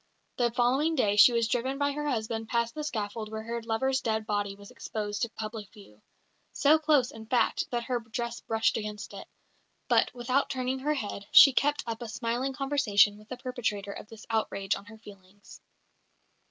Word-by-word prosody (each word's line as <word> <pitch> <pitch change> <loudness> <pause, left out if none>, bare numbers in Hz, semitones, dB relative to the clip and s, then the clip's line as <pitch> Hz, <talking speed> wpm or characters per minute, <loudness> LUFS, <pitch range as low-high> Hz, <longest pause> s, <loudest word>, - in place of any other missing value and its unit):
The 240 -1 +2
following 265 +7 +2
day 205 -7 +2
she 210 +4 +8
was 230 -1 +1
driven 255 +3 -1
by 285 0 +1
her 295 +1 -3
husband 225 -2 -2
past 235 -1 0
the 305 - -5
scaffold 215 -5 -4
where 220 0 -5
her 235 +1 -4
lover's 260 +4 0
dead 220 -1 -1
body 205 -2 -2
was 200 0 -14
exposed 205 -1 -5
to 235 - 0
public 215 -2 -7
view 110 - -17 0.5
so 305 +2 +4
close, 295 -5 +3
in 220 0 -11
fact, 245 +1 +1
that 240 -1 -2
her 245 0 -1
dress 235 +1 -5
brushed 225 0 0
against 210 -2 -6
it; 195 - -9 0.6
but, - - +3
without 250 +3 0
turning 260 0 -2
her 300 +3 0
head, 205 -5 -5
she 275 - +9
kept 290 +3 +1
up 230 0 -5
a 235 - -5
smiling 240 +4 -2
conversation 255 -7 +2
with 215 - -18
the 255 - -6
perpetrator 220 -6 -3
of 210 - -9
this 225 -1 -13
outrage 200 -3 0
on - - -10
her 220 +1 -13
feelings. 200 -2 -15
230 Hz, 190 wpm, -28 LUFS, 210-260 Hz, 0.6 s, she